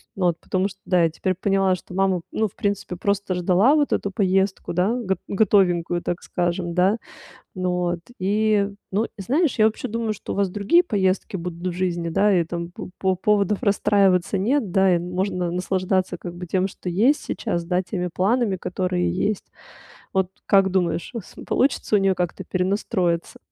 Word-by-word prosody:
Ну 185 Hz, -2 st, +1 dB
вот, 170 Hz, -1 st, +1 dB
потому 190 Hz, +1 st, -1 dB
что, 195 Hz, 0 st, -15 dB
да, 180 Hz, -2 st, +3 dB
я 165 Hz, -, +3 dB
теперь 185 Hz, +4 st, -1 dB
поняла, 195 Hz, 0 st, +2 dB
что 180 Hz, -, -12 dB
мама, 190 Hz, -1 st, +1 dB
ну, 220 Hz, -, 0 dB
в 190 Hz, -, -17 dB
принципе, 200 Hz, -3 st, -2 dB
просто 200 Hz, +1 st, -1 dB
ждала 185 Hz, -, +4 dB
вот 295 Hz, -2 st, +2 dB
эту 200 Hz, -, 0 dB
поездку, 190 Hz, 0 st, 0 dB
да, 180 Hz, +6 st, +1 dB
год 220 Hz, -6 st, -1 dB
готовенькую, 180 Hz, -4 st, +2 dB
так 175 Hz, -, -3 dB
скажем, 175 Hz, 0 st, -2 dB
да. 185 Hz, +4 st, +3 dB, 0.6 s
Ну 185 Hz, -1 st, -1 dB
вот, 175 Hz, -1 st, -1 dB, 0.2 s
и 205 Hz, +1 st, +2 dB, 0.2 s
ну, 210 Hz, +4 st, +1 dB
и 215 Hz, -, -10 dB
знаешь, 285 Hz, -, +1 dB
я 215 Hz, -, +4 dB
вообще 220 Hz, +3 st, 0 dB
думаю, 230 Hz, -1 st, -2 dB
что 210 Hz, -, -6 dB
у -, -, -5 dB
вас 200 Hz, -1 st, +1 dB
другие 205 Hz, -, +3 dB
поездки 195 Hz, -, 0 dB
будут 175 Hz, 0 st, -6 dB
в 180 Hz, -, 0 dB
жизни, 175 Hz, -2 st, -1 dB
да, 200 Hz, +3 st, +3 dB
и 170 Hz, -, +3 dB
там 170 Hz, +1 st, -5 dB
по -, -, -7 dB
по 190 Hz, -1 st, +1 dB
поводов 205 Hz, +1 st, +1 dB
расстраиваться 200 Hz, -2 st, +3 dB
нет, 220 Hz, +1 st, 0 dB
да, 190 Hz, -1 st, +4 dB
и -, -, +4 dB
н 175 Hz, +1 st, -5 dB
можно 180 Hz, -2 st, -1 dB
наслаждаться 185 Hz, +1 st, -1 dB
как 175 Hz, -1 st, -8 dB
бы 180 Hz, +1 st, -7 dB
тем, 185 Hz, +2 st, +1 dB
что 185 Hz, -1 st, -7 dB
есть 230 Hz, +12 st, +2 dB
сейчас, 175 Hz, -7 st, -2 dB
да, 180 Hz, +2 st, 0 dB
теми 180 Hz, -1 st, -3 dB
планами, 205 Hz, +1 st, +1 dB
которые 180 Hz, 0 st, -1 dB
есть. 185 Hz, +3 st, -1 dB, 0.7 s
Вот 190 Hz, -1 st, +1 dB, 0.2 s
как 195 Hz, -1 st, +4 dB
думаешь, 175 Hz, -2 st, 0 dB
э, -, -, -2 dB
см 180 Hz, -, -13 dB
получится 255 Hz, -4 st, +2 dB
у -, -, +4 dB
неё 195 Hz, -1 st, +2 dB
как-то 180 Hz, -2 st, -3 dB
перенастроиться? 185 Hz, -2 st, -1 dB
190 Hz, 190 wpm, -23 LUFS, 180-205 Hz, 0.7 s, ждала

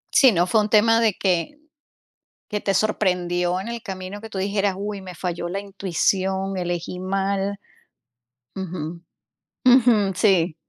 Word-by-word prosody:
Sí, 260 Hz, -3 st, +7 dB
no 175 Hz, -2 st, +2 dB
fue 215 Hz, +4 st, +3 dB
un 210 Hz, -, -2 dB
tema 225 Hz, +2 st, +5 dB
de 220 Hz, -4 st, +2 dB
que 180 Hz, -, 0 dB, 0.9 s
que 210 Hz, -1 st, -2 dB
te 195 Hz, -, 0 dB
sorprendió 180 Hz, -4 st, 0 dB
en 210 Hz, -, -6 dB
el 235 Hz, -1 st, -5 dB
camino, 190 Hz, -1 st, -7 dB
que 225 Hz, 0 st, -10 dB
tú 195 Hz, -, -5 dB
dijeras: 200 Hz, 0 st, 0 dB
"Uy, 200 Hz, -1 st, -4 dB
me 180 Hz, -1 st, -9 dB
falló 175 Hz, 0 st, -4 dB
la 195 Hz, +3 st, -3 dB
intuición, 195 Hz, 0 st, -1 dB
elegí 175 Hz, 0 st, -3 dB
mal". 195 Hz, +1 st, -1 dB, 1.0 s
Ujú. 175 Hz, -3 st, -5 dB, 0.6 s
Ujú, 240 Hz, -6 st, +5 dB
sí. 185 Hz, -4 st, +3 dB
195 Hz, 145 wpm, -23 LUFS, 180-210 Hz, 1.0 s, Sí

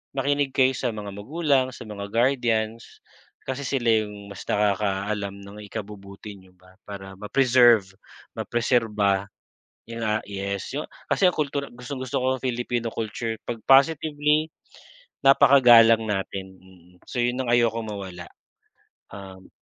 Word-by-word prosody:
makinig 140 Hz, 0 st, 0 dB
kayo 130 Hz, -1 st, +4 dB
sa 125 Hz, -, -1 dB
mga 105 Hz, -1 st, -7 dB
magulang 135 Hz, +4 st, 0 dB
sa -, -, -9 dB
mga 100 Hz, -1 st, -6 dB
guardians 115 Hz, -2 st, -1 dB, 0.4 s
kasi 130 Hz, +1 st, -3 dB
sila 125 Hz, -4 st, 0 dB, 0.2 s
yung 105 Hz, -1 st, -11 dB
mas 100 Hz, -, -9 dB
nakakaalam 100 Hz, 0 st, -1 dB
ng 100 Hz, +1 st, -12 dB
ikabubuti 100 Hz, 0 st, -9 dB
niyo 95 Hz, -1 st, -20 dB
ba. 90 Hz, +1 st, -22 dB
Para 95 Hz, -1 st, -9 dB
ma-preserve, 120 Hz, -3 st, +4 dB, 0.4 s
mapreserba, 105 Hz, -5 st, 0 dB, 0.6 s
'yun 115 Hz, 0 st, -5 dB
nga, 110 Hz, 0 st, 0 dB
yes 100 Hz, 0 st, -4 dB
yu 150 Hz, -, -2 dB, 0.3 s
kasi 195 Hz, -, +3 dB
ang 180 Hz, -, +2 dB
kultura 140 Hz, -1 st, -2 dB
gustong-gusto 125 Hz, +1 st, -5 dB
ko -, -, -1 dB
nga -, -, -19 dB
Filipino 120 Hz, -1 st, -2 dB
culture 115 Hz, +1 st, -4 dB
'pag 120 Hz, -, -4 dB
positively 150 Hz, +2 st, +3 dB, 0.8 s
napaka-galang 120 Hz, -4 st, +7 dB
natin. 95 Hz, -2 st, -4 dB, 0.5 s
So 125 Hz, -, -4 dB
'yon 120 Hz, +1 st, 0 dB
ang 120 Hz, -, -2 dB
ayokong 115 Hz, -2 st, +1 dB
mawala. 95 Hz, -3 st, -7 dB, 0.8 s
Um 95 Hz, -1 st, -11 dB
115 Hz, 130 wpm, -24 LUFS, 100-130 Hz, 0.8 s, napaka-galang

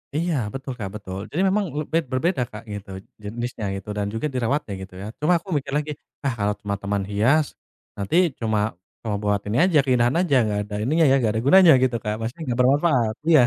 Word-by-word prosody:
Iya, 170 Hz, +1 st, 0 dB, 0.2 s
betul 135 Hz, -1 st, -5 dB
Kak, 100 Hz, -2 st, -3 dB
betul. 95 Hz, -2 st, -6 dB
Jadi 175 Hz, -, -1 dB
memang 205 Hz, +1 st, +1 dB
le 150 Hz, +2 st, -3 dB
bed 165 Hz, -2 st, +1 dB
berbeda 130 Hz, +2 st, +1 dB
Kak, 105 Hz, -, -9 dB
gitu, 100 Hz, 0 st, -7 dB, 0.3 s
jenisnya, 115 Hz, +1 st, -5 dB
gitu. 95 Hz, +2 st, -10 dB
Dan 105 Hz, -, 0 dB
juga 115 Hz, -, -2 dB
dirawatnya, 125 Hz, -2 st, -1 dB
gitu 95 Hz, -1 st, -10 dB
ya. 100 Hz, +3 st, -6 dB
Cuma 170 Hz, +3 st, +4 dB
aku 170 Hz, -, -12 dB
mikir 140 Hz, -, -5 dB
lagi, 150 Hz, 0 st, -2 dB, 0.3 s
"Ah, 135 Hz, -, +1 dB
kalau 105 Hz, +1 st, +1 dB
cuma 100 Hz, -1 st, -4 dB
taman 100 Hz, -1 st, -1 dB
hias, 125 Hz, +10 st, +2 dB, 0.4 s
nanti 160 Hz, -, +2 dB
cuma 110 Hz, -1 st, 0 dB, 0.3 s
cuma 105 Hz, -2 st, -1 dB
buat 105 Hz, -1 st, +2 dB
ini 105 Hz, +3 st, 0 dB
aja, 175 Hz, -5 st, +4 dB
keindahan 125 Hz, -2 st, +3 dB
aja, 175 Hz, -6 st, +2 dB
nggak 105 Hz, -1 st, -1 dB
ada 105 Hz, -, -6 dB
ininya 160 Hz, +6 st, +3 dB
ya, 135 Hz, -, +5 dB
nggak 110 Hz, -2 st, +2 dB
ada -, -, 0 dB
gunanya," 185 Hz, +2 st, +8 dB
gitu 125 Hz, -2 st, +1 dB
Kak. 105 Hz, 0 st, -2 dB
Maksudnya 120 Hz, +9 st, -5 dB
nggak 120 Hz, -, -1 dB
bermanfaat. 130 Hz, -4 st, +3 dB, 0.2 s
Iya. 155 Hz, -5 st, +7 dB
120 Hz, 215 wpm, -23 LUFS, 105-150 Hz, 0.4 s, gunanya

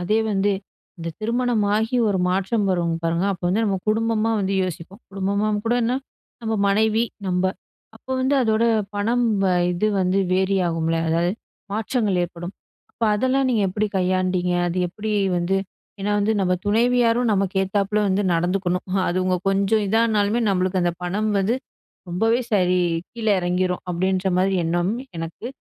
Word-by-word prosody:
அதே 210 Hz, +5 st, +1 dB
வந்து 200 Hz, 0 st, +1 dB, 0.5 s
இந்த 165 Hz, 0 st, -5 dB
திருமணமாகி 225 Hz, -1 st, +1 dB
ஒரு 195 Hz, -2 st, +1 dB
மாற்றம் 195 Hz, +3 st, 0 dB
வரும் 170 Hz, -2 st, 0 dB
பாருங்க. 165 Hz, +3 st, +1 dB
அப்ப 185 Hz, -, -9 dB
வந்து 210 Hz, +5 st, +1 dB
நம்ம 200 Hz, -3 st, 0 dB
குடும்பமா 225 Hz, 0 st, +1 dB
வந்து 195 Hz, 0 st, -1 dB
யோசிப்போம். 185 Hz, +3 st, -6 dB
குடும்பமாம் 200 Hz, +2 st, -1 dB
கூடன்னா, 240 Hz, +1 st, +1 dB, 0.5 s
நம்ம 220 Hz, 0 st, -1 dB
மனைவி 220 Hz, +3 st, +2 dB, 0.2 s
நம்ப 180 Hz, 0 st, 0 dB, 0.5 s
அப்போ 260 Hz, +3 st, -7 dB
வந்து 265 Hz, +2 st, +2 dB
அதோட 220 Hz, 0 st, +2 dB, 0.3 s
பணம் 235 Hz, +4 st, +1 dB, 0.2 s
வந்து -, -, +3 dB, 0.2 s
இது 180 Hz, +4 st, 0 dB
வந்து 185 Hz, +1 st, +1 dB
வேரி 190 Hz, +1 st, +2 dB
ஆகும்ல. 165 Hz, 0 st, 0 dB
அதாவது 170 Hz, +2 st, +1 dB, 0.4 s
மாற்றங்கள் 215 Hz, -3 st, 0 dB
ஏற்படும். 175 Hz, +1 st, -6 dB, 0.4 s
அப்ப -, -, -15 dB
அதெல்லாம் 260 Hz, +4 st, +1 dB
நீங்க 225 Hz, -5 st, +2 dB
எப்பிடி 210 Hz, +3 st, -1 dB
கையாண்டீங்க. 185 Hz, -1 st, +1 dB, 0.2 s
அது 175 Hz, -, -4 dB
எப்பிடி 215 Hz, +4 st, -4 dB, 0.3 s
வந்து 175 Hz, +3 st, 0 dB, 0.4 s
ஏன்னா 205 Hz, +1 st, -1 dB
வந்து 205 Hz, +2 st, +2 dB
நம்ம 180 Hz, -1 st, +1 dB
துணைவியாரும் 235 Hz, +2 st, +2 dB
நமக்கு 195 Hz, -1 st, 0 dB
ஏத்தாப்ல 200 Hz, +2 st, 0 dB
வந்து 195 Hz, +2 st, +1 dB
நடந்துக்கணும். 180 Hz, +2 st, -1 dB, 0.2 s
அது 175 Hz, -, -1 dB
உங்க 185 Hz, 0 st, +1 dB
கொஞ்சம் 200 Hz, +2 st, +2 dB
இதா 220 Hz, +3 st, +2 dB
ஆனாலுமே 215 Hz, +1 st, +1 dB
நம்மளுக்கு 185 Hz, 0 st, +1 dB
அந்த 175 Hz, -1 st, +1 dB
பணம் 210 Hz, +5 st, -1 dB
வந்து 210 Hz, +6 st, +1 dB, 0.5 s
ரொம்பவே 225 Hz, +7 st, +2 dB
சரி 180 Hz, -2 st, +3 dB, 0.3 s
கீழ 230 Hz, -2 st, -6 dB
இறங்கிரும். 180 Hz, +1 st, -1 dB
அப்பிடின்றமாரி 185 Hz, +1 st, +1 dB
எண்ணம் 175 Hz, +4 st, 0 dB, 0.3 s
எனக்கு 165 Hz, +8 st, -6 dB
195 Hz, 150 wpm, -22 LUFS, 180-220 Hz, 0.5 s, வந்து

